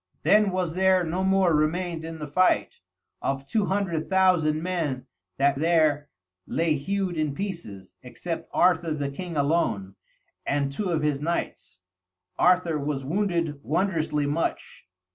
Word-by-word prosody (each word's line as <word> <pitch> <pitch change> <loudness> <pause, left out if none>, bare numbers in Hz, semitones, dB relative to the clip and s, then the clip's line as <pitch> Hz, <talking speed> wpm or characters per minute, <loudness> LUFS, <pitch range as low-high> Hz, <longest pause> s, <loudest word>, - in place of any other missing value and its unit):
Then 210 0 +5
was 180 -3 -1
there 185 0 +3
no 175 +3 -2
more 190 -2 +3
remained 160 +2 0
in 165 0 -6
the 150 - -5
fight, 185 +6 +1 0.4
of 135 0 -2
two 210 +7 0
hundred 185 -5 -1
thousand 175 -5 +3
men 165 -8 -2 0.3
that 140 0 +2
there 155 -2 +2 0.4
lay 165 -1 +1
hewed 185 +5 -2
in 155 -3 -1
pieces, 125 - -7
except 165 +7 -6
Arthur 170 -3 +2
the 140 -2 -3
king 170 +2 -6
alone, 140 - 0 0.5
and 140 -1 0
two 190 +7 -3
of 160 -3 0
his 145 -2 0
knights. 165 - -3 0.6
Arthur 180 -3 +3
was 140 -2 -3
wounded 170 -3 -1
wondrously 160 -3 0
much. 145 - -3
165 Hz, 140 wpm, -26 LUFS, 145-185 Hz, 0.6 s, Then